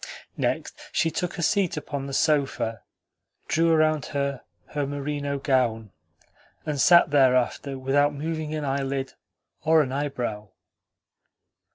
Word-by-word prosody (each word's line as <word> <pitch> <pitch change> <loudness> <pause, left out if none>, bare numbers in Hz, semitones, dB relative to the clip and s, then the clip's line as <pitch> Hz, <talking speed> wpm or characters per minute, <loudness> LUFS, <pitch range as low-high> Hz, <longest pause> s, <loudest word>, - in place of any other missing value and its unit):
Next, - - -2
she 165 - +1
took 180 +1 -3
a 170 - -2
seat 195 -3 +1
upon 140 -2 -4
the - - -6
sofa, 135 -7 +1 0.7
drew 165 +1 +2
around 155 -3 +2
her 140 -2 -2 0.3
her 145 -2 -2
merino 145 0 -3
gown, 125 -6 0 0.7
and 150 -3 -1
sat 170 -1 +6
thereafter 135 0 +2
without 140 +2 +2
moving 155 +1 -4
an 150 -1 -3
eyelid 135 -1 -2 0.5
or 160 0 +5
an 130 - -5
eyebrow. 125 -7 -3
140 Hz, 125 wpm, -25 LUFS, 135-155 Hz, 0.7 s, sat